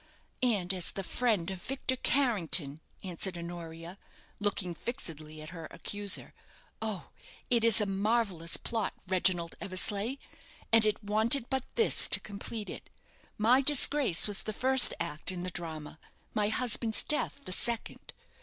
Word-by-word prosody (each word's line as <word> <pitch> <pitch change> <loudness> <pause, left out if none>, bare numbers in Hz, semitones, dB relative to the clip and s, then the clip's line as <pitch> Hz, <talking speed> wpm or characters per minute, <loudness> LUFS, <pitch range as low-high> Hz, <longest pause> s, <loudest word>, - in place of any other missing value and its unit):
"And 200 -7 0
as 180 -2 0
the 195 - -6
friend 205 -5 -1
of 185 -2 -8
Victor 260 +2 -3
Carrington," 185 - 0 0.2
answered 185 0 -2
Honoria, 170 +1 -9 0.4
looking 200 -3 -2
fixedly 155 - -8
at 155 - -11
her 165 -3 -9
accuser. 205 -1 -3 0.5
"Oh! 215 -8 -5 0.4
it 235 -2 +2
is 230 -2 +5
a 210 - 0
marvellous 195 -4 0
plot, 225 -4 -4
Reginald 180 -2 0
Eversleigh, 205 +5 -1 0.6
and 225 -1 +6
it 210 +1 -2
wanted 225 +6 +2
but 265 -1 -1
this 455 - +5
to - - +2
complete 210 +1 -7
it. - - -9 0.5
My 240 +5 +3
disgrace 275 - +5
was 205 -1 -1
the 215 - -5
first 260 +3 +7
act 170 0 -4
in 180 -1 -6
the 185 - -5
drama, 160 -3 -5 0.3
my 210 -1 0
husband's 225 0 +3
death 300 -1 -2
the - - -7
second. 230 +5 0
205 Hz, 145 wpm, -29 LUFS, 175-230 Hz, 0.6 s, first